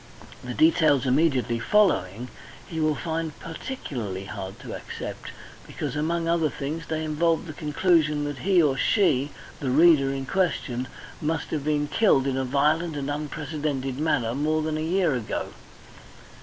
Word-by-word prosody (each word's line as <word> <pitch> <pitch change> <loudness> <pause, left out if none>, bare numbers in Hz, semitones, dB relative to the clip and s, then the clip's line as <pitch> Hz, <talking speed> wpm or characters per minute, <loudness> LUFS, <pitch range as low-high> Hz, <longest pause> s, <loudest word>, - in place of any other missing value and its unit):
The - - -5
details 155 - +4
immediately 130 -4 +2
following 125 - +2 0.4
he 160 +5 -5
will 155 -1 +2
find 160 0 -3
particularly 125 - -5
hard 95 -3 -7
to - - -7
accept, - - -7 0.4
because - - -4
among 165 +2 -1
other 165 -2 +2
things 150 +4 -5
they 160 0 -2
involve 160 +2 +1
the 155 - -7
conclusion 150 0 +2
that 145 -2 -4
he 185 -3 +4
or 140 -3 +2
she, 145 - +2 0.3
the 135 - -2
reader 145 -1 +5
in 135 0 -3
question, 130 -8 -1 0.3
must 155 0 -2
have 150 -3 -2
been 150 0 0
killed 170 -9 +3
in 135 -1 0
a 135 - 0
violent 150 +5 +1
and 140 0 -2
unprecedented 145 -3 -3
manner 125 -7 +1
more 155 +3 0
than 155 0 -1
a - - -2
year 170 0 +1
ago. 120 -4 -3
150 Hz, 155 wpm, -25 LUFS, 135-165 Hz, 0.4 s, reader